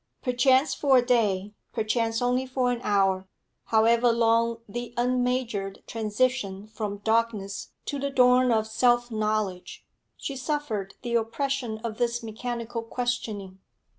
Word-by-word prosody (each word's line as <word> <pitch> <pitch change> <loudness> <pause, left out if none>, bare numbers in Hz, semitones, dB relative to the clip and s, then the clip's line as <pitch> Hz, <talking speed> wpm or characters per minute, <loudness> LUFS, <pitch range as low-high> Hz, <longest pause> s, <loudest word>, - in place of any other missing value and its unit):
Perchance 260 +2 +3
for 270 -1 +4
a 245 - +3
day, 210 -5 +1 0.2
perchance 225 +1 0
only 250 +1 +1
for 255 -1 +1
an 240 -1 -3
hour, 195 -4 +1 0.4
however 230 +2 +4
long 230 0 +2
the 240 +3 -6
unmeasured 245 -5 -1
transition 215 -2 -1
from 210 -2 -5
darkness 220 -3 -1
to 285 - -3
the 280 +1 -1
dawn 250 -1 +4
of 220 -1 +2
self 240 +2 +2
knowledge, 215 -4 -2 0.3
she 275 - -5
suffered 255 -8 -3
the 240 -1 -3
oppression 235 0 -1
of 225 -1 -4
this 240 0 0
mechanical 230 +1 -4
questioning. 225 -5 -3
235 Hz, 130 wpm, -26 LUFS, 215-250 Hz, 0.4 s, for